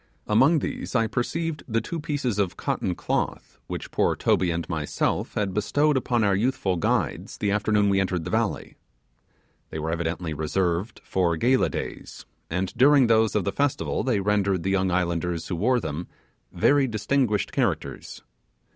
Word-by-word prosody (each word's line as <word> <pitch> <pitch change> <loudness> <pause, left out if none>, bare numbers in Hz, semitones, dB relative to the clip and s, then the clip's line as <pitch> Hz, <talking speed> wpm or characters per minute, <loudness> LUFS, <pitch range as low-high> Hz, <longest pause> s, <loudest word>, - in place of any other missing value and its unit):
Among 135 +10 +4
these 140 - -4
I 115 -2 +3
perceived 150 +8 -2 0.2
two 170 -1 -4
pieces 140 -8 -2
of 95 -3 0
cotton 90 - -2
cloth - - -3
which - - -6
poor - - +2
Toby 90 - +2
and 85 0 -2
myself 80 -4 -2
had 100 -3 -1
bestowed 145 +9 +2
upon 120 -3 +1
our 100 -1 +3
youthful 100 -3 0
guides 105 - -1
the 100 - 0
afternoon 105 0 +2
we 100 -1 +3
entered 90 -3 -1
the - - -4
valley. - - -1 0.9
They - - -6
were 80 +1 -2
evidently 85 0 -2
reserved 85 +6 -1
for 85 -3 0
gala 125 +8 +3
days; - - -6 0.2
and 90 +2 -2
during 140 0 +6
those 110 -1 +3
of 105 - +2
the 100 - -1
festival 145 +6 0
they 125 -6 +1
rendered 100 -3 +1
the 95 - 0
young 95 -1 +1
islanders 85 -2 -1
who 90 - -1
wore 120 +8 +2
them 80 -2 -5 0.4
very 140 -1 +3
distinguished 110 -1 0
characters. - - -2
100 Hz, 160 wpm, -25 LUFS, 90-125 Hz, 0.9 s, during